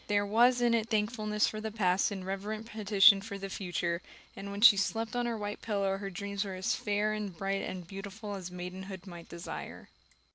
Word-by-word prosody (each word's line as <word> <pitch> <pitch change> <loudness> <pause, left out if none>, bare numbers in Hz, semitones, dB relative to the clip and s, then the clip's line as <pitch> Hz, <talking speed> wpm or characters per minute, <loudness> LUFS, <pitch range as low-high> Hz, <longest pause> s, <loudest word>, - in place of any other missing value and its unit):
There 205 0 +2
was 240 +4 +4
in 240 -1 +4
it 225 -1 +1
thankfulness 215 -1 +1
for 215 - -4
the 220 - -3
past 195 -3 +2
and 195 -3 -5
reverent 205 +3 -4
petition 205 -2 +5
for 200 0 -6
the 195 0 -6
future; 175 -2 -2 0.3
and 200 - -7
when 200 0 -5
she 235 -2 +10
slept 225 +4 -1
on 245 0 0
her 230 -1 -2
white 205 0 -5
pillow 200 -3 0
her 195 -1 -4
dreams 200 +1 -3
were 195 -2 -5
as 185 0 0
fair 210 +1 0
and 205 -5 -4
bright 195 +1 -1
and 180 -2 -5
beautiful 200 +3 -7
as 185 -3 -5
maidenhood 185 +1 -7
might 175 -3 -10
desire. 170 +1 -7
200 Hz, 205 wpm, -31 LUFS, 190-215 Hz, 0.3 s, she